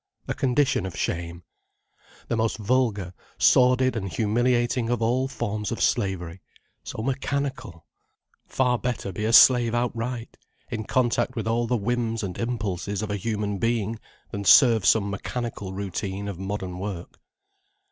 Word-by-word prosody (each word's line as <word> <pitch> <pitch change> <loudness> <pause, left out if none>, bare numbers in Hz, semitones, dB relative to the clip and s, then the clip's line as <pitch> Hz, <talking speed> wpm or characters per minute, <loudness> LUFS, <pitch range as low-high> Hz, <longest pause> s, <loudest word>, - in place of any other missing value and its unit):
A - - -1
condition 130 -5 +1
of 95 - -8
shame. 85 0 -3 0.8
The - - -1
most 110 0 0
vulgar, 105 -5 0 0.2
sordid 125 0 +4
and 95 -4 -3
humiliating 120 +3 +1
of 120 -2 0
all 125 +3 +1
forms 105 -5 -3
of - - -3
slavery: 95 -2 -1 0.4
so 110 - -6
mechanical. 135 - -3 0.6
Far 125 -2 +1
better 120 -5 -3
be 105 +4 -4
a 110 - +1
slave 120 -1 +7
outright, 120 0 -3 0.3
in 110 -2 -3
contact 120 0 +1
with 110 -1 -3
all 115 +1 +1
the 125 +1 +1
whims 115 +1 -1
and 90 -3 -4
impulses 105 -4 -2
of 105 - -3
a - - 0
human 105 -1 -2
being, 115 -1 -1 0.3
than 100 - -4
serve 115 -2 +6
some 105 -3 +4
mechanical 100 0 -4
routine 100 +1 -4
of 95 -3 -6
modern 95 -2 -4
work. 95 -3 -6
115 Hz, 145 wpm, -25 LUFS, 100-120 Hz, 0.8 s, slave